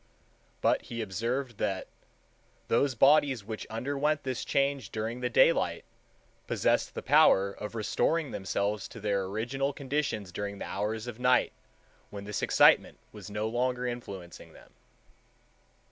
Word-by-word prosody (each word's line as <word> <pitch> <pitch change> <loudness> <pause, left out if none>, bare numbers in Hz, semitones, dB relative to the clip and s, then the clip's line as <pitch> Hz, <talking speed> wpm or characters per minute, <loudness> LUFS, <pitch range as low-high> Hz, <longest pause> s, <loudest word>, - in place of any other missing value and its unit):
But - - +3
he 115 - -6
observed 115 +5 -3
that 95 -1 -1 0.8
"those 130 +3 +2
bodies 135 -2 +4
which 110 +1 -6
underwent 145 +6 -1
this 130 -2 -3
change 140 -5 0
during 110 +3 -4
the 125 0 -1
daylight 120 - +3 0.6
possessed - - +1
the - - -5
power 100 +1 +5
of 105 +2 -8
restoring 145 +7 0
themselves 100 +1 -2
to - - -11
their 100 -2 0
original 120 +8 -2
conditions 135 -9 -2
during 100 +2 -4
the - - -6
hours 105 +3 -3
of 120 -1 -7
night, 125 0 +3 0.6
when 100 -1 -8
this 105 0 -4
excitement - - +4
was - - -10
no 105 +1 -2
longer 125 +2 -1
influencing 100 -8 -7
them." - - -18
115 Hz, 135 wpm, -29 LUFS, 100-130 Hz, 0.8 s, power